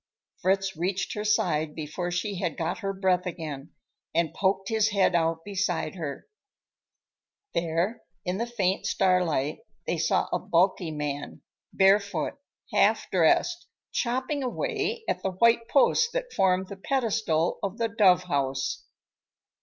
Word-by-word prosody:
Fritz 190 0 +1
reached 185 +4 -2
her 210 - -3
side 160 -7 +1
before 160 +3 -4
she 180 +2 -2
had 175 -5 -2
got 165 +5 -2
her 195 -3 -2
breath 190 -2 +1
again, 155 -4 -6 0.5
and 165 -2 +1
poked 195 0 0
his 220 -1 +2
head 200 -3 +2
out 165 -1 +1
beside 190 -6 -1
hers. 155 -6 -5 1.3
There, 170 +7 -1 0.2
in 180 +2 -1
the 235 - -1
faint 195 -6 0
starlight, 170 -6 +1 0.3
they - - -1
saw - - +2
a - - +2
bulky 180 0 +1
man, 145 -2 -5 0.3
barefoot, 200 - +2 0.3
half - - +3
dressed, 350 0 +2 0.2
chopping 260 +4 -1
away 435 - -2
at 185 - -1
the 190 0 -2
white 230 +4 +3
post 460 - +3
that - - -3
formed 185 0 +2
the 200 - -7
pedestal 215 - 0
of 200 +2 -3
the 230 -2 +1
dove 190 -4 +4
house. 135 -5 -2
190 Hz, 140 wpm, -27 LUFS, 165-215 Hz, 1.3 s, dove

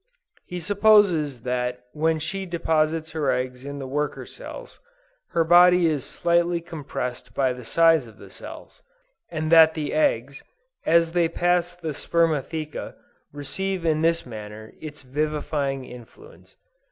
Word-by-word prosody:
He 180 - -5
supposes 180 - +3
that 125 0 -2
when 160 +1 +1
she 190 +5 -4
deposits 160 -2 0
her 155 -4 -1
eggs 125 0 -2
in 140 0 -6
the 135 - -6
worker 145 +3 -3
cells, - - -10 0.5
her 170 -2 +2
body 175 +1 +6
is 150 -5 +1
slightly 170 0 +1
compressed 140 -7 -6
by 130 -2 +2
the 125 0 -10
size 165 0 +3
of 110 -2 -16
the - - -14
cells, - - -11 0.5
and 155 -1 -3
that 160 -1 +7
the 155 -2 -3
eggs, 305 -2 0 0.5
as 165 0 +4
they 170 -1 +2
pass 175 +1 +1
the 165 -3 -5
spermatheca, 155 -1 -1 0.4
receive 180 +6 -3
in 155 -1 +2
this 165 +1 +1
manner, 110 -2 -9
its 150 -2 -9
vivifying 145 -1 -2
influence. 125 - -14
155 Hz, 140 wpm, -24 LUFS, 135-170 Hz, 0.5 s, that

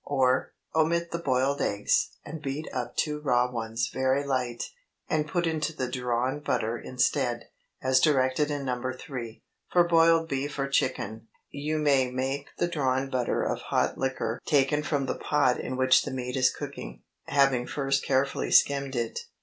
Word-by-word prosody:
Or, 130 -2 +1 0.2
Omit 170 +2 +1
the 170 - -2
boiled 135 -2 +1
eggs, 100 0 +1 0.2
and 155 +1 -7
beat 145 +2 -4
up 125 -2 -4
two 150 -1 0
raw 125 -4 +2
ones 115 -1 -2
very 130 +2 +1
light, 125 -3 -2 0.4
and 155 -1 0
put 175 +2 0
into 160 0 -1
the 130 -4 -2
drawn 125 +2 -1
butter 120 -5 -1
instead, 125 0 -1 0.3
as 130 0 +4
directed 135 0 +2
in 145 -2 -3
No. 125 -1 -2 0.2
3. 125 -8 -7 0.3
For 175 - +5
boiled 165 -1 +4
beef 145 0 -3
or 135 0 0
chicken, 115 -5 -1 0.2
you 150 +2 -2
may 140 -4 +3
make 135 +3 -2
the 175 - +1
drawn 135 -5 0
butter 125 -2 0
of - - -2
hot - - 0
liquor 130 -3 -2
taken 145 -1 +2
from 145 -2 -1
the - - -1
pot 145 -4 +2
in 130 - -4
which 130 0 +5
the - - -4
meat 125 -1 -4
is 130 -1 +4
cooking, - - -8 0.2
having 135 -3 +2
first 135 -1 0
carefully 135 +1 0
skimmed 140 -1 +3
it. 115 -2 -2
135 Hz, 165 wpm, -27 LUFS, 125-150 Hz, 0.4 s, For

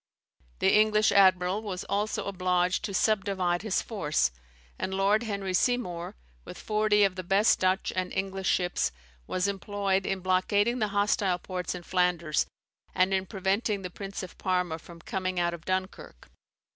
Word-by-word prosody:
The - - +3
English 215 0 +4
admiral 190 0 +4
was 190 -4 -5
also 210 +2 -2
obliged 180 -1 0
to 210 - -4
subdivide 190 -3 +1
his 215 -2 0
force; 155 - 0 0.5
and 190 - -2
Lord 200 +3 +3
Henry 200 -4 -3
Seymour, 180 -5 0 0.3
with - - -10
forty 210 -1 +2
of 195 -2 +3
the 185 - -5
best 195 +5 +3
Dutch 185 +2 +1
and 185 0 -2
English 190 0 -2
ships, 180 -1 +1 0.4
was 185 +1 0
employed 200 -1 -1
in 195 -1 -2
blockading 205 +6 +1
the 215 - +1
hostile 200 -2 +1
ports 180 0 -4
in 180 - -8
Flanders, 175 -4 +1 0.5
and 185 +1 +3
in 190 0 0
preventing 200 +1 -1
the 180 - -5
Prince 195 +1 -6
of 185 - -10
Parma 180 -3 0
from 170 +1 -13
coming 185 0 -2
out 175 0 +1
of 170 -1 -9
Dunkirk. 185 - -4
190 Hz, 160 wpm, -28 LUFS, 180-205 Hz, 0.5 s, English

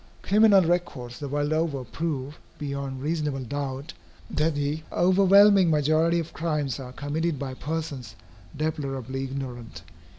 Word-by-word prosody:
Criminal 205 -1 +6
records 155 -9 -2
the 145 - -4
world 145 +2 0
over 155 -4 0
prove, 145 +2 -4 0.2
beyond 140 -2 -4
reasonable 150 -3 -1
doubt, 135 0 -4 0.4
that 155 0 +1
the 145 +2 -1
overwhelming 195 +1 +6
majority 155 +2 +3
of 165 -1 -4
crimes 150 -5 -2
are 125 -2 -7
committed 150 +4 -2
by 130 -1 -4
persons 140 -6 -5 0.4
deplorably 135 -4 -3
ignorant. 125 - -6
145 Hz, 125 wpm, -26 LUFS, 135-165 Hz, 0.4 s, Criminal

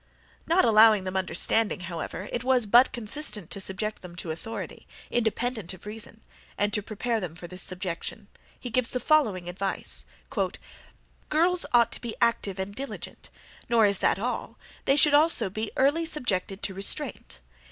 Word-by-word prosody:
Not 340 +3 +4
allowing 215 -3 +6
them 185 0 -5
understanding, 190 +3 +1
however, 175 +2 -5
it 240 - -2
was 255 -2 +3
but 240 +5 +6
consistent 215 - -2
to 195 - -4
subject 205 +3 -3
them 180 -2 -10
to 175 -2 -4
authority, 195 +8 -7 0.2
independent 225 -4 -1
of 185 - -18
reason; 220 +1 -8 0.4
and 205 0 0
to 210 - +2
prepare 225 +3 -2
them 175 -5 -6
for 170 - -10
this 185 +2 -3
subjection, 180 -2 -3 0.3
he 245 - -7
gives 255 0 +1
the 250 - -1
following 220 - +2
advice: 190 +2 -1 1.2
"Girls 345 +4 +4
ought 235 -1 +4
to - - -4
be 235 -2 -5
active 230 -5 +1
and 190 +1 -4
diligent; 275 +5 -7 0.4
nor 230 -2 +5
is 200 -2 +2
that - - +2
all; 245 +5 -4 0.3
they 275 - +4
should 295 0 +4
also 300 - +4
be 215 +2 -3
early 295 +5 +2
subjected 200 - -1
to 195 - 0
restraint. 195 - -2
215 Hz, 165 wpm, -27 LUFS, 190-245 Hz, 1.2 s, allowing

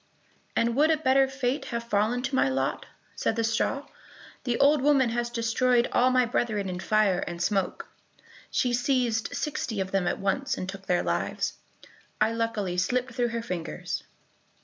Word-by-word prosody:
"And 230 0 +1
would 300 +3 +4
a 320 - +4
better 270 -2 +3
fate 265 0 -2
have 235 -1 -3
fallen 235 +2 0
to 265 +1 -3
my 195 - +3
lot?" 135 0 -1 0.3
said - - 0
the 230 - 0
straw. 225 +5 0 0.6
"The 245 -2 0
old 285 0 +4
woman 275 -3 +4
has 240 0 -1
destroyed 240 +1 +2
all 250 +1 +4
my 255 -1 +3
brethren 220 -4 -1
in 180 -1 -4
fire 205 -2 +2
and 170 - -5
smoke; 190 +1 -1 0.6
she 250 -1 +1
seized 245 -1 0
sixty 280 -7 -2
of 190 0 -2
them 195 -2 +1
at - - 0
once, 230 +8 -1
and 185 - -4
took 195 0 -8
their 180 - +2
lives. - - -1 0.7
I 215 +1 +3
luckily 225 -5 -2
slipped 245 +6 0
through 240 +1 +1
her 230 0 -3
fingers." 180 -7 -4
235 Hz, 170 wpm, -27 LUFS, 200-255 Hz, 0.7 s, would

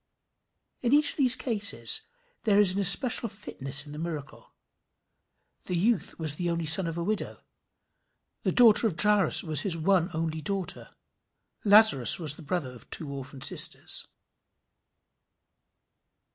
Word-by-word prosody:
In 245 +1 -1
each 295 +1 +4
of - - -13
the 270 -4 +1
cases 230 -5 +2 0.4
there 205 -3 +1
is 205 -3 +6
an 195 - -3
especial 225 +4 +2
fitness 140 -9 -2
in 145 - -13
the 150 - -9
miracle. 155 -4 -9 1.1
This 180 - -3
youth 215 +3 -2
was 155 -3 -1
the 175 +3 -4
only 170 -1 -3
son 165 +3 +6
of 165 0 -6
a 170 - -4
widow; 210 +3 -5 1.0
the - - -2
daughter 230 -2 +4
of 175 -7 -6
Jairus 210 -2 +2
was 155 -4 0
his 175 -2 -1
"one 175 +1 0
only 160 0 -5
daughter;" 195 +3 -7 0.7
Lazarus 205 - +5
was 155 -4 -2
the - - -14
brother 155 -4 -5
of 125 -3 -16
two 150 -3 -5
orphan 135 0 -10
sisters. - - 0
175 Hz, 145 wpm, -26 LUFS, 155-210 Hz, 1.1 s, is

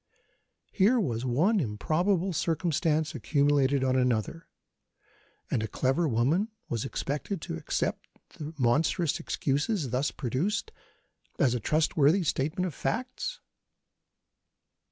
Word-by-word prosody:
Here 220 +6 +4
was 120 - -1
one 170 - +2
improbable 175 - 0
circumstance 160 -1 0
accumulated 140 -2 +2
on 130 -1 +2
another, 125 +5 0 1.0
and 110 - +1
a 110 - -2
clever 135 +9 +1
woman 140 - +2 0.2
was 115 -2 -1
expected 150 +7 -3
to - - -4
accept 80 - -2 0.2
the 150 0 -7
monstrous 145 +5 +1
excuses, 145 - -1
thus 130 +4 +1
produced, 170 - -2 0.7
as 130 -4 +3
a 125 - -1
trustworthy 155 - +3
statement 160 +5 0
of 175 - -3
facts. 255 - -3
150 Hz, 110 wpm, -28 LUFS, 130-180 Hz, 1.0 s, Here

